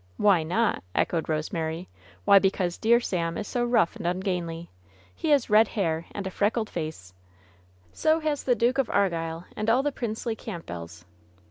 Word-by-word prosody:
" - - -33
Why 190 -5 +6
not 195 +9 +1
V - - -13
" - - -32
echoed 165 -2 -2
Rosemary. 160 +2 -2 0.2
* - - -25
Why, 200 -1 +8
because 190 -2 0
dear 235 +2 +4
Sam 170 -7 -2
is 210 - -4
so 245 - -1
rough 240 -8 +2
and - - -4
ungainly. 175 -2 -3 0.4
He - - -3
has 285 -4 +4
red 215 +1 +5
hair 165 -7 -2
and 200 - -5
a 190 - -3
freckled 215 +3 0
face 155 - -5 0.8
^^ - - -28
"So 315 +1 +3
has 305 -2 -1
the 245 - +3
Duke 240 +4 +1
of 265 - +1
Argyll 165 -3 0
and 215 +1 -1
all 250 +4 +4
the 290 - 0
princely 230 -2 -3
Campbells 85 - -8
195 Hz, 195 wpm, -26 LUFS, 165-230 Hz, 0.8 s, Why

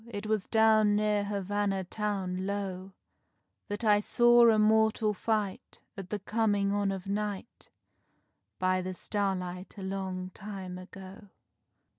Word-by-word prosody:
It 205 -2 -6
was 215 -3 -1
down 220 -2 +4
near 210 -1 +1
Havanna 200 -1 -1
town, 190 -3 -3
low, 195 -1 -4 0.7
That 205 +2 -4
I 210 -2 +5
saw 240 +2 +5
a 220 - +4
mortal 220 0 +3
fight, 210 -1 -3 0.2
At 195 -2 -8
the 210 - -2
coming 205 -1 0
on 205 -1 +1
of 190 -2 -5
night, 205 +1 -4 0.9
By 185 0 +1
the 185 0 -5
starlight 185 -2 -3
a 195 - -7
long 190 -1 -4
time 190 -2 -7
ago. 195 +2 -12
205 Hz, 130 wpm, -30 LUFS, 190-210 Hz, 0.9 s, I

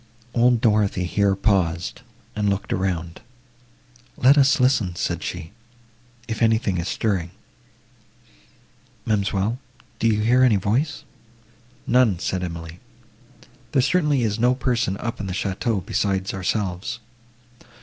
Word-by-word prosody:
Old 120 -1 +3
Dorothée 105 -5 +2
here 100 +2 +1
paused, 95 -3 0 0.3
and 105 -1 0
looked 100 0 -2
around; 85 -3 -2 1.0
"Let 130 +3 +6
us 145 +1 +4
listen," 125 -9 +2
said 85 0 -2
she, 80 -2 -6 0.8
"if 110 -1 -4
anything 110 -5 +2
is 85 - -3
stirring; 95 -7 -1 1.8
Ma'amselle, 105 +2 0 0.4
do 115 - +2
you 105 -1 +2
hear 120 +4 +3
any 125 -4 +5
voice?" 120 - -1 0.8
"None," 125 -7 +3
said 90 +2 -2
Emily, 85 -1 -7 0.9
"there 135 - +4
certainly 150 -5 +2
is 110 -1 -1
no 125 +2 +3
person 120 -6 0
up 115 +2 -5
in 100 - -4
the 95 - -3
château, 100 +1 -2
besides 95 -3 -1
ourselves." 95 +3 -2
105 Hz, 120 wpm, -23 LUFS, 95-120 Hz, 1.8 s, Let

